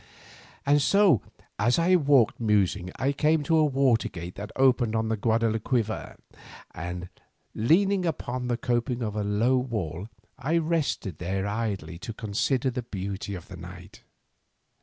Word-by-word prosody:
And 145 +1 +4
so 195 - +4 0.4
as 120 +4 +3
I 175 +2 +4
walked 140 - +3
musing 100 -4 +1
I 135 +2 0
came 150 +2 +2
to 160 +3 +2
a 155 - +5
water 135 -5 +2
gate 85 +1 -7
that 105 +1 -7
opened 125 -4 +3
on 110 - +1
to 110 - -3
the 110 - 0
Guadalquivir, 110 +1 0 0.6
and 90 +1 -5 0.5
leaning 185 - +2
upon 125 -5 -3
the 120 -1 0
coping 120 +1 -1
of 105 -2 -3
a 105 - -1
low 110 +6 +2
wall 105 - -3 0.3
I 155 +6 +1
rested 155 - -1
there 95 +2 -2
idly 100 -5 -3
to 115 +2 -6
consider 120 +5 0
the 125 0 -3
beauty 100 -2 -5
of 90 -1 -10
the 90 - -10
night. 90 +1 -11
115 Hz, 155 wpm, -27 LUFS, 100-135 Hz, 0.6 s, a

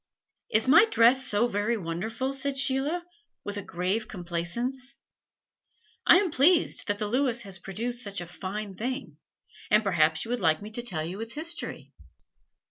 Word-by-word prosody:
"Is 220 +3 +2
my 330 +11 +8
dress 250 - +4
so 210 +1 +2
very 220 +1 0
wonderful?" 220 +9 -3
said 275 0 -2
Sheila, 275 +6 +1 0.4
with 205 - -5
a - - -3
grave 190 +5 -2
complacence. 235 +10 -4 1.1
"I 350 - +9
am 375 -3 +1
pleased 320 +5 +3
that 205 -1 0
the 210 - -2
Lewis 245 +1 +1
has 195 -3 -5
produced 235 +7 -4
such 200 -1 -3
a 175 - -5
fine 195 +4 -6
thing, 255 +7 -4 0.5
and 210 +1 +4
perhaps 160 -4 +2
you 230 - -6
would 245 - 0
like 160 -3 +2
me 210 +1 -8
to 240 - -2
tell 180 -10 -2
you 185 +6 -6
its 225 0 -4
history. 330 +3 -7
225 Hz, 165 wpm, -27 LUFS, 195-260 Hz, 1.1 s, I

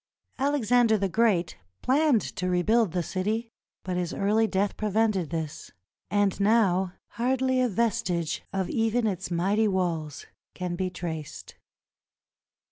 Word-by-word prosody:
Alexander 245 -5 +3
the 200 -1 0
Great 190 -4 +1 0.3
planned 275 -3 +3
to 185 0 -3
rebuild 200 +3 +2
the 180 0 -1
city, 215 +6 -2 0.3
but 180 -1 -3
his 175 -1 -2
early 215 +3 +2
death 200 0 0
prevented 210 -5 0
this, 160 -2 -5 0.4
and 205 -2 +1
now 195 -4 +3 0.2
hardly 260 +1 +1
a 250 - +2
vestige 185 -6 -1
of 190 -2 -1
even 225 +1 +1
its 190 -6 -2
mighty 195 +6 +1
walls 170 -6 -2 0.3
can 180 -1 -3
be 185 +1 -1
traced. 165 -4 -6
200 Hz, 125 wpm, -27 LUFS, 180-225 Hz, 0.4 s, Alexander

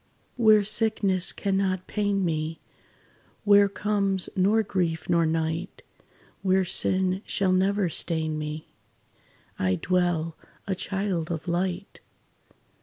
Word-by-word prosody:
"Where 215 -3 +5
sickness 205 -3 +1
cannot 190 -2 -1
pain 200 -2 0
me 160 -1 -2 0.8
Where 205 -1 +6
comes 200 -2 -1
nor 205 +4 +3
grief 170 -5 -2
nor 170 -2 +3
night 160 +2 -2 0.6
Where 190 -1 +2
sin 185 +1 +1
shall 190 -2 0
never 190 +1 +2
stain 160 -2 -2
me, 150 +1 -6 0.9
I 95 -1 +1
dwell, 175 - 0 0.3
a 195 - -1
child 190 -3 -2
of 165 +1 -4
light. 180 +2 -2
185 Hz, 110 wpm, -26 LUFS, 165-200 Hz, 0.9 s, Where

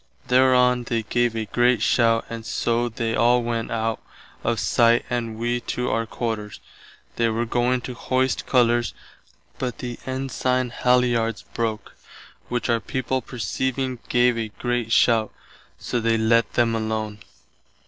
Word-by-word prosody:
Thereon 125 -1 +4
they 115 -1 -1
gave 120 +2 0
a 110 -1 -2
great 120 +2 +2
shout 115 -2 +3
and 115 -1 -6
so 120 +1 0
they 115 0 -2
all 120 +2 +3
went 115 -1 -2
out 115 -1 -2 0.4
of 115 -1 0
sight 120 -1 +3
and 115 -2 -2
wee 120 +1 -1
to 125 0 -3
our 115 0 -1
quarters. 110 -3 -4 0.6
They 115 -1 +2
were 115 +1 -1
going 125 +2 +1
to 125 - -6
hoist 130 +1 -1
colours 120 -2 +2 0.6
but 125 -2 -3
the 120 -1 -6
ensigne 130 -1 -1
halliards 120 -3 +1
broke, 110 -2 -3 0.5
which 120 -1 -1
our 115 -1 +2
people 130 +2 -2
perceiving 130 +1 -3
gave 120 -1 +3
a 110 - -2
great 120 +1 -3
shout, 115 -2 +3 0.5
so 120 - -2
they 115 0 +1
lett 115 0 +2
them 120 -1 +2
alone. 110 -1 -2
120 Hz, 145 wpm, -23 LUFS, 115-125 Hz, 0.6 s, Thereon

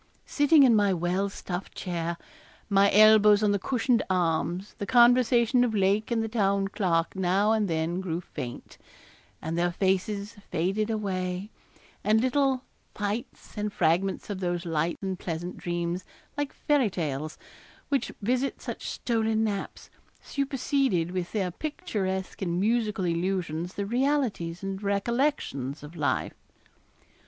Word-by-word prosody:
Sitting 290 0 +5
in 245 -4 +6
my 205 -3 +3
well 180 +4 0
stuffed 180 -1 -6
chair, 170 -1 -3 0.5
my 200 0 +5
elbows 210 0 +7
on 210 - +3
the 200 - +1
cushioned 240 +2 +1
arms, 175 +2 0
the 200 - -4
conversation 245 0 +5
of 230 -3 0
Lake 200 +2 +2
and 230 -2 +1
the - - -2
Town 200 -3 +1
Clerk 175 -4 0
now 190 +3 +2
and 215 -2 +2
then 165 +2 -1
grew 170 -3 -2
faint, 125 -8 -8 0.6
and 160 +1 -2
their 175 +1 +1
faces 200 +3 -1
faded 195 +6 0
away, 190 -2 -2 0.5
and 215 +1 +4
little 265 +1 +1 0.3
'fyttes' 210 +3 -4
and 210 -1 -2
fragments 185 +2 +1
of 195 - -4
those 175 -1 -2
light 165 0 -1
and 190 -1 -3
pleasant 175 +1 -4
dreams, 175 +1 -2 0.3
like 290 -1 -2
fairy 285 -7 +1
tales, 155 -4 -3 0.5
which 280 -2 0
visit 255 +5 0
such - - -6
stolen 225 -2 0
naps, 205 -3 -4 0.3
superseded 270 - 0
with 180 -1 -3
their 190 -4 -1
picturesque 205 - -3
and 175 -2 -1
musical 215 -2 +1
illusions 175 -1 -2
the 200 - -2
realities 235 -8 0
and 195 0 -4
recollections 200 - -1
of 150 +3 -10
life. 150 -3 -1
195 Hz, 135 wpm, -27 LUFS, 175-225 Hz, 0.6 s, elbows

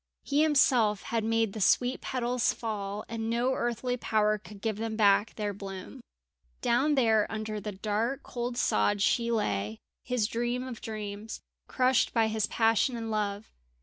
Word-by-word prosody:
He 285 +1 +1
himself 255 -9 +3
had 230 -2 -1
made 225 -2 +1
the 215 - -5
sweet 250 +6 +3
petals 250 -1 0
fall, 210 -2 -4
and 225 -1 -4
no 240 +3 +1
earthly 240 +1 -1
power 215 -2 +1
could 210 0 -12
give 215 0 -2
them 225 0 -3
back 210 0 +3
their 205 -2 -2
bloom. 195 -1 -8 0.6
Down 280 +6 +2
there 225 -5 +3
under 215 -1 -4
the 210 - -4
dark 215 +6 -2
cold 240 0 -4
sod 195 - +2
she 235 +1 +2
lay, 105 - -1 0.3
his 250 -4 0
dream 240 +3 -1
of 240 -3 -7
dreams, 215 -1 -6 0.3
crushed 255 -1 +2
by 225 -1 +3
his 220 -1 0
passion 225 +2 +2
and 225 -1 -4
love. 210 0 -2
225 Hz, 160 wpm, -29 LUFS, 210-240 Hz, 0.6 s, himself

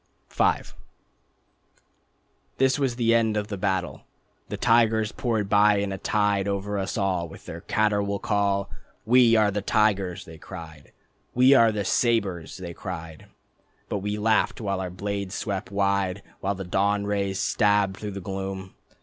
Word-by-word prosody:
V - - +1 2.1
This 135 +1 +2
was 130 -4 0
the 115 -1 +2
end 110 -2 +2
of 105 0 -2
the 100 - -3
battle. 95 -2 -1 0.5
The - - -4
tigers 110 -1 +3
poured 110 -5 -1
by 105 +1 +5
in 100 0 -1
a 95 - -5
tide 105 -2 +1
Over 100 +1 -2
us 95 +3 -3
all 95 -4 0
with - - -13
their 85 +1 -8
caterwaul 100 -1 0
call, 100 -1 0 0.3
"We 120 0 +5
are 105 -2 +4
the 105 +1 -2
tigers," 100 -4 +1
They 80 -1 -12
cried. 80 -7 -10 0.4
"We 130 +2 +6
are 115 -4 +6
the 105 -2 -3
sabres," 100 - 0
They 90 -2 -7
cried. 80 -3 -8 0.6
But 105 - -1
we 105 +2 -3
laughed 105 -1 +1
while 100 -4 -2
our 90 - -3
blades 100 +1 -4
swept 100 -3 -3
wide, 100 -1 0 0.2
While 100 +1 -1
the 95 - -6
dawn 100 +3 0
rays 100 -1 -1
stabbed 100 -3 +2
through 105 -2 -6
the 100 - -6
gloom. 95 0 -5
100 Hz, 160 wpm, -25 LUFS, 95-105 Hz, 2.1 s, We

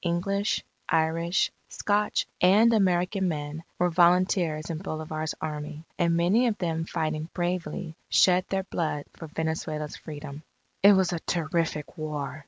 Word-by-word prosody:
English, 195 +4 0 0.3
Irish, 165 +2 +1 0.2
Scotch, 210 0 0 0.2
and 210 +6 +6
American 190 -1 +2
men, 155 -1 -4
were 180 0 +2
volunteers 175 -2 +3
in 160 - -4
Bolivar's 155 -2 -4
Army, 150 0 -5 0.2
and 170 -1 +3
many 200 +9 +3
of 215 -3 0
them 165 -3 -1
fighting 155 -1 -2
bravely, 175 -2 -2
shed 185 0 +5
their 190 0 0
blood 155 -5 -2
for 160 - -9
Venezuela's 155 -1 -3
Freedom. 150 -1 -8 0.4
It 200 +1 +8
was 190 -2 +2
a 170 - -2
terrific 165 -1 -2
war! 150 -1 -4
170 Hz, 135 wpm, -27 LUFS, 155-185 Hz, 0.4 s, It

